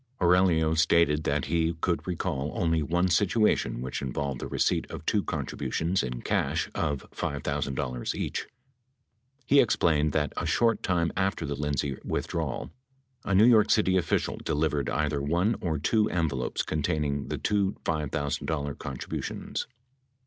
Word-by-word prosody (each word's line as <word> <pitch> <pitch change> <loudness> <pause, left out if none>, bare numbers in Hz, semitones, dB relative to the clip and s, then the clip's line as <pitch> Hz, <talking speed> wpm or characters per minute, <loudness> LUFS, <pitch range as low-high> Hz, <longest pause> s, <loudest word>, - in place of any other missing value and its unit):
Aurelio 85 -3 +4
stated 80 -1 +3
that 70 -2 0
he 80 +2 +1
could 85 +2 -1
recall 75 -5 -2
only 80 -6 +1
one 85 +4 +1
situation 100 - +2
which 65 - -4
involved 70 0 -3
the - - -4
receipt - - 0
of - - -8
two - - +2
contributions 90 +4 -1
in 60 -1 -4
cash - - 0
of 75 -3 -2
$5,000 70 -2 -2
each. - - -3 1.0
He 140 +3 +5
explained 75 - +3
that 75 -1 0
a - - -2
short 115 -1 +2
time 85 -3 +1
after 95 -3 0
the 70 - -2
Lindsay 70 -2 -2
withdrawal, 60 - -3 0.5
a 100 - +1
New 105 +4 +7
York 110 -3 +6
City 95 -4 +3
official 90 -3 0
delivered 75 -2 -1
either 75 -2 0
one 85 +10 +1
or 80 -4 -1
two 105 +8 +2
envelopes 75 -8 -1
containing 75 -2 -1
the - - -3
two 100 -2 0
$5,000 70 -1 -2
contributions. 65 -1 -4
80 Hz, 140 wpm, -28 LUFS, 70-90 Hz, 1.0 s, New